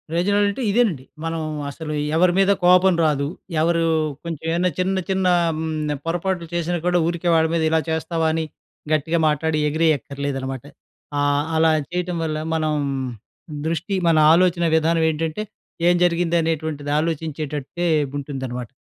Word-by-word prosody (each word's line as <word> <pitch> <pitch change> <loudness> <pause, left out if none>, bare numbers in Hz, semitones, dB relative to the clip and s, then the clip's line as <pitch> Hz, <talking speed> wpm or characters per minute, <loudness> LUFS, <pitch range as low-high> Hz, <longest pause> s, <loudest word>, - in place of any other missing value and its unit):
Result 200 +4 +1
ఇదేనండి. 200 - +1 0.2
మనం 165 0 -2 0.3
అసలు 155 +1 -6 0.2
ఎవరి 175 +2 +4
మీద 195 +1 +4
కోపం 180 +1 +6
రాదు. 145 -2 +1 0.4
ఎవరు 170 +1 +2 0.4
కొంచెం 165 -3 -6
ఏమన్నా 175 +2 +1
చిన్న, 190 +1 +1
చిన్న 190 -1 0 0.3
హ్మ్. 155 -1 -2
పొరపాట్లు 175 +1 -1
చేసినా 175 +1 -1
కూడా 180 0 +3
ఊరికే 170 +1 -1
వాడి 160 0 +3
మీద 165 -1 +1
ఇలా 160 0 +3
చేస్తావా, 160 0 -1
అని 160 0 -1 0.5
గట్టిగా 160 +2 +1
మాట్లాడి 155 +1 0
ఎగిరేయక్కర్లేదనమాట. 140 -4 -1 0.5
ఆహ్, 145 0 +2
అలా 160 0 +4 0.2
చేయటం 180 0 -2
వల్ల 155 -1 -2 0.2
మనం, 155 -1 0 0.9
దృష్టి 165 +5 -2
మన 165 -1 +4 0.2
ఆలోచన 175 0 +3
విధానం 160 +1 +2
ఏంటంటే 160 +5 -2 0.4
ఏం 175 - +5
జరిగింది 175 -1 +1
అనేటువంటిది 160 -2 -2
ఆలోచించేటట్టే 155 0 -3 0.3
ఉంటుందనమాట. 130 -4 -5
165 Hz, 130 wpm, -22 LUFS, 155-175 Hz, 0.9 s, కోపం